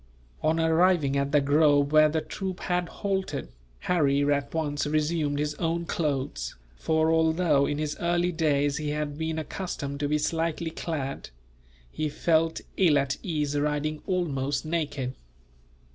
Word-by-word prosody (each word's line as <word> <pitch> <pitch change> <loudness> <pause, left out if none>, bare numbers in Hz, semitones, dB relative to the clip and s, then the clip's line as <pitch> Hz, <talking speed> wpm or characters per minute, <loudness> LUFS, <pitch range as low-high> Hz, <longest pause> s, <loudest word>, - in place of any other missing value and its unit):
On 160 +1 +1
arriving 160 -3 +3
at 140 0 0
the 145 -1 +4
grove 145 0 +3
where 155 0 +6
the 160 +1 0
troop 185 +4 -5
had 180 -2 -1
halted, 195 - -3 0.3
Harry 145 -5 +2
at 140 -1 -2
once 145 -2 -1
resumed 150 -1 0
his 150 +1 -1
own 170 0 -1
clothes; 135 - -2 0.2
for 160 - +1
although 160 -3 +3
in 145 - -1
his 150 0 -2
early 175 +1 +1
days 145 -3 +1
he 150 -1 -3
had 150 -1 -2
been 160 +1 -3
accustomed 150 -3 -4
to 145 - 0
be 150 - +2
slightly 165 +1 -1
clad, 145 -5 -4 0.6
he 155 -1 -2
felt 160 +2 +1 0.2
ill 165 -6 +5
at 140 -1 0
ease 150 -5 -2
riding 150 +1 -1
almost 145 -6 -1
naked. 145 -5 -2
155 Hz, 145 wpm, -27 LUFS, 145-165 Hz, 0.6 s, where